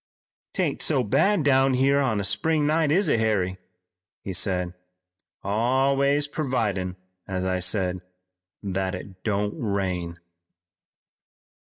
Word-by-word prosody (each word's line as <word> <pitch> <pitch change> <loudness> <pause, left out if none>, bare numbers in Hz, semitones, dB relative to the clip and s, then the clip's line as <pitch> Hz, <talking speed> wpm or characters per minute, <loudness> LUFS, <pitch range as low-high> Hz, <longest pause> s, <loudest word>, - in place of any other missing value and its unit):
"'Tain't - - -1
so - - +3
bad 205 -5 +2
down 135 -1 +4
here 135 +2 +3
on 125 -7 +1
a - - -2
spring 150 +10 +1
night, 155 0 +2
is 190 +4 +3
it, 115 - +2
Harry?" 95 -4 0 0.6
he 95 - -4
said. 90 -1 -1 0.7
"Always 135 +7 +2
purvidin', 110 - -2 0.3
as 95 -1 -2
I 95 0 0
said, 90 -1 0 0.6
that 95 -1 -2
it 95 0 -10
don't 105 -1 -1
rain." 95 -5 -2
105 Hz, 120 wpm, -25 LUFS, 95-140 Hz, 0.7 s, down